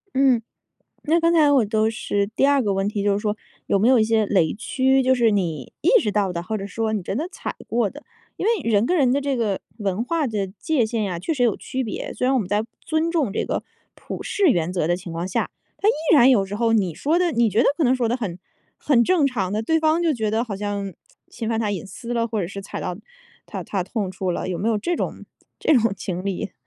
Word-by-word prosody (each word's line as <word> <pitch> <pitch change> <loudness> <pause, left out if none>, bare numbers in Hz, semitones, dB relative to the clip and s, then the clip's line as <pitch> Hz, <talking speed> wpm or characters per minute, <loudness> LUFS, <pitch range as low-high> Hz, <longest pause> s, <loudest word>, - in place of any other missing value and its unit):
嗯。 260 -3 +4 0.6
那 325 +3 +3
刚 335 0 +3
才 305 -3 +5
我 265 -6 +4
都 215 +1 +1
是 205 -2 -1
第 225 +6 +1
二 285 -1 +4
个 205 -2 +1
问 195 +1 0
题， 205 -1 -2
就 205 - +2
是 200 - +1
说 210 -1 -1 0.3
有 - - +3
没 215 +5 +3
有 260 -2 +6
一 - - +4
些 220 -1 +2
雷 180 -6 +2
区？ 265 +4 +1
就 260 +1 +4
是 235 -3 +3
你 165 - -2
意 - - +3
识 215 - -1
到 200 -3 +1
的， 170 -1 -3
或 215 +5 -3
者 195 - -5
说 220 +2 -2
你 205 -4 -2
真 195 - -3
的 315 +5 -2
踩 390 - -6
过 230 -3 +1
的， 295 - -12 0.4
因 - - -3
为 415 - +1
人 210 +1 +3
跟 360 - +1
人 270 -7 +3
的 275 - +2
这 280 -1 -1
个 215 -5 0 0.2
文 200 0 -1
化 310 +5 0
的 210 -5 -2
界 230 +7 0
限 220 0 -2
呀， 180 -4 -3
确 325 - -2
实 260 -5 0
有 230 -5 +2
区 260 0 -3
别。 220 - -5
虽 - - -2
然 260 - +3
我 265 - +3
们 200 - -3
在 205 +3 +1 0.2
尊 320 +1 -1
重 295 - 0
这 - - 0
个 - - -2 0.3
普 - - -7
世 405 -2 +1
原 175 - +2
则 175 -4 0
的 175 - +2
情 180 -1 -8
况 165 +2 -3
下， 190 - -1 0.3
他 415 - +3
依 - - +6 0.2
然 265 -4 +7
有 215 -7 +4
时 195 +1 -5
候 230 +1 +1
你 190 -8 +1
说 320 +5 +1
得 350 -3 +1
你 235 -2 +3
觉 210 - +1
得 - - +2
可 320 - 0
能 255 -2 +4
说 250 -3 0
得 235 - 0
很 195 -8 -5 0.4
很 250 -5 +3
正 330 -1 +3
常 200 -8 -2
的， 210 +2 -1
对 320 +8 +2
方 315 +2 +3
就 330 -3 +2
觉 220 -4 -1
得 220 +1 +1
好 230 -4 -4
像 200 -1 -3 0.4
侵 230 -2 -5
犯 225 -1 0
他 220 -2 0
隐 200 -3 -3
私 230 +5 -7
了， 230 -1 +1
或 225 -2 -2
者 175 - -2
是 200 +2 -7
踩 195 - -7
到 180 - -3 0.5
他 - - -6
他 195 -3 -2
的 - - -18
痛 210 -5 -1
处 185 0 -2
了， 175 - -3
有 180 -2 -2
没 220 - 0
有 220 - +2
这 345 +12 -1
种 - - -4 0.3
这 315 - +3
种 230 -3 +2
经 180 -1 -4
历？ 195 -1 -3
225 Hz, 290 characters per minute, -23 LUFS, 200-265 Hz, 0.6 s, 然